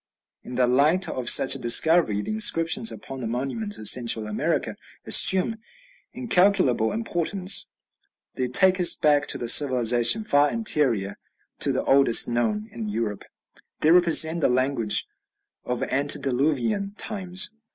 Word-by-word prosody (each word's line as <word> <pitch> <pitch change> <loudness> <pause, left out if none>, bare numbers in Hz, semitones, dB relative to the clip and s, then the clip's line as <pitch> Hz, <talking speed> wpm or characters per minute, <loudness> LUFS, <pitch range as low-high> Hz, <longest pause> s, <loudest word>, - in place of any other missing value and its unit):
In 125 - -11
the 125 0 +1
light 145 +9 0
of 125 -2 -2
such 135 - +5
a 135 - -5
discovery 120 -3 +2
the - - -7
inscriptions 215 0 +1
upon 135 -9 -11
the 115 - -5
monuments 140 - -5
of 110 - -4
Central 115 -2 +3
America 105 0 -4 0.3
assume 190 +4 +4 0.5
incalculable 185 - 0
importance; 195 -2 -1 0.6
they 130 - -4
take 185 +9 +2
us 180 - +4
back 145 -1 0
to - - -4
a - - -5
civilization 125 - +2
far 145 -7 +1
anterior 130 - -2 0.4
to - - +2
the - - -3
oldest 135 -4 +2
known 110 -3 -3
in 115 -2 -8
Europe; 105 -1 -6 0.6
they 155 - +2
represent 170 -1 +3
the - - +1
language 125 -4 -1 0.6
of 125 -1 -4
antediluvian 140 - -2
times. 190 -1 -1
140 Hz, 135 wpm, -22 LUFS, 120-185 Hz, 0.6 s, such